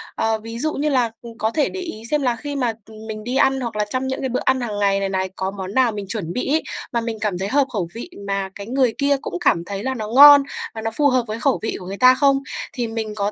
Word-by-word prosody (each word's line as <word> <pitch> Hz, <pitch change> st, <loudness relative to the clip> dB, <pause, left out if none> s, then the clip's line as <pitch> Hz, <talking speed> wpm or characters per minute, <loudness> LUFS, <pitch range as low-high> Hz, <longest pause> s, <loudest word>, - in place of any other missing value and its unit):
ờ, 225 Hz, 0 st, 0 dB
ví 225 Hz, +1 st, -7 dB
dụ 310 Hz, +4 st, -1 dB
như 300 Hz, +2 st, 0 dB
là, 250 Hz, -5 st, +2 dB
ừm, 230 Hz, -1 st, -11 dB
có 220 Hz, -1 st, 0 dB
thể 290 Hz, +3 st, +1 dB
để 380 Hz, -, -6 dB
ý 330 Hz, -12 st, -6 dB
xem 300 Hz, -1 st, +2 dB
là 250 Hz, -3 st, +1 dB
khi 285 Hz, +4 st, -6 dB
mà, 245 Hz, -4 st, 0 dB
ừm, 220 Hz, 0 st, -12 dB
mình 215 Hz, -1 st, -6 dB
đi 245 Hz, +3 st, -3 dB
ăn 270 Hz, 0 st, +3 dB
hoặc 235 Hz, -3 st, -4 dB
là 210 Hz, 0 st, 0 dB
trong 255 Hz, +3 st, -2 dB
những 265 Hz, -, -3 dB
cái 265 Hz, -, -2 dB
bữa 250 Hz, -, -1 dB
ăn 260 Hz, -1 st, +2 dB
hàng 215 Hz, -4 st, -3 dB
ngày 200 Hz, -1 st, +2 dB
này 195 Hz, 0 st, -1 dB
này 190 Hz, 0 st, -1 dB
có 190 Hz, 0 st, -2 dB
món 195 Hz, -1 st, -6 dB
nào 255 Hz, -1 st, +3 dB
mình 205 Hz, -2 st, -5 dB
chuẩn 185 Hz, -5 st, -4 dB
bị 250 Hz, -, -2 dB
ấy 320 Hz, -, +2 dB, 0.3 s
mà 235 Hz, -, +1 dB
mình 230 Hz, -1 st, -4 dB
cảm 205 Hz, -4 st, -1 dB
thấy 190 Hz, +2 st, -2 dB
hợp 275 Hz, +5 st, +2 dB
khẩu 190 Hz, -6 st, -1 dB
vị 235 Hz, +9 st, -6 dB, 0.2 s
mà 195 Hz, -1 st, -1 dB
cái 200 Hz, 0 st, -8 dB
người 255 Hz, -1 st, +2 dB
kia 280 Hz, 0 st, +2 dB
cũng 175 Hz, -, -5 dB
cảm 170 Hz, -, +2 dB
thấy 200 Hz, +1 st, -5 dB
là 265 Hz, +1 st, -1 dB
nó 220 Hz, -4 st, -5 dB
ngon 285 Hz, +4 st, +9 dB, 0.3 s
và 220 Hz, -, -6 dB
nó 225 Hz, 0 st, -2 dB
phù 290 Hz, +6 st, +2 dB
hợp 255 Hz, -2 st, +2 dB
với 215 Hz, +1 st, -4 dB
khẩu 270 Hz, +2 st, +1 dB
vị 225 Hz, -, -2 dB
của 180 Hz, -, -10 dB
người 195 Hz, +2 st, -6 dB
ta 255 Hz, +2 st, +7 dB
không? 275 Hz, 0 st, +3 dB, 0.3 s
Thì 245 Hz, -3 st, -2 dB
mình 225 Hz, -1 st, -4 dB
có 205 Hz, 0 st, -1 dB
230 Hz, 300 wpm, -21 LUFS, 210-265 Hz, 0.3 s, ngon